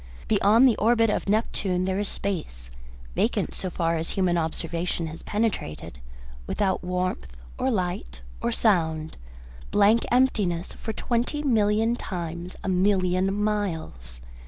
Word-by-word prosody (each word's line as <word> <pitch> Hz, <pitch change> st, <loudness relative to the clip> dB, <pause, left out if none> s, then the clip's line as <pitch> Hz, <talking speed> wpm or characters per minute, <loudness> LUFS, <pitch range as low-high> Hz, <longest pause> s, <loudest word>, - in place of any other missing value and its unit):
Beyond 220 Hz, +4 st, +5 dB
the 235 Hz, -, +4 dB
orbit 225 Hz, 0 st, +3 dB
of -, -, -2 dB
Neptune 195 Hz, -4 st, 0 dB
there 190 Hz, +1 st, 0 dB
is 205 Hz, -, -1 dB
space, 65 Hz, -, -4 dB, 0.4 s
vacant -, -, 0 dB
so 185 Hz, -, -3 dB
far 165 Hz, -1 st, 0 dB
as 160 Hz, +1 st, -3 dB
human 185 Hz, -2 st, +2 dB
observation 165 Hz, +1 st, -2 dB
has 160 Hz, +1 st, -7 dB
penetrated, 205 Hz, -, -3 dB, 0.5 s
without 190 Hz, -3 st, 0 dB
warmth 180 Hz, -, -2 dB, 0.3 s
or 260 Hz, -, +1 dB
light 180 Hz, -, -2 dB, 0.2 s
or -, -, 0 dB
sound, 160 Hz, -, +1 dB, 0.5 s
blank 210 Hz, +3 st, +4 dB
emptiness, 205 Hz, -9 st, +1 dB
for 220 Hz, -, -5 dB
twenty 240 Hz, +6 st, -1 dB
million 225 Hz, -2 st, +2 dB
times 175 Hz, -4 st, -5 dB
a -, -, -4 dB
million 185 Hz, 0 st, +2 dB
miles. 165 Hz, -, -3 dB
190 Hz, 130 wpm, -25 LUFS, 170-215 Hz, 0.5 s, Beyond